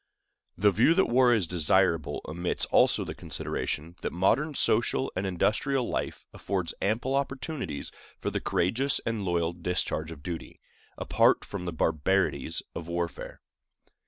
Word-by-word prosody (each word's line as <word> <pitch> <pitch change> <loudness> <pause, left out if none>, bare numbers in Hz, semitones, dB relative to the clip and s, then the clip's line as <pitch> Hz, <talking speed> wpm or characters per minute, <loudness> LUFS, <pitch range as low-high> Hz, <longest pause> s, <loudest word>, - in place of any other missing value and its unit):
The 100 +3 +4
view 115 - +4
that 190 - +4
war 125 +1 +4
is 110 -6 +3
desirable 85 -1 +2
omits 85 +3 -1
also - - +4
the - - -5
consideration 80 +2 -4
that - - -2
modern 145 - +1
social 120 +3 +1
and 95 +1 -1
industrial 115 +8 +1
life - - -3
affords 95 -4 -2
ample 115 +6 0
opportunities 135 - -3 0.3
for - - -3
the - - -2
courageous 125 +10 +1
and 115 -3 -1
loyal 85 -2 0
discharge 85 -2 -2
of 75 -3 -10
duty, 85 -1 -6 0.4
apart - - +3
from 95 -3 -6
the 90 - -2
barbarities 80 -1 0
of 85 - -6
warfare. 85 0 -4
95 Hz, 140 wpm, -28 LUFS, 85-120 Hz, 0.4 s, The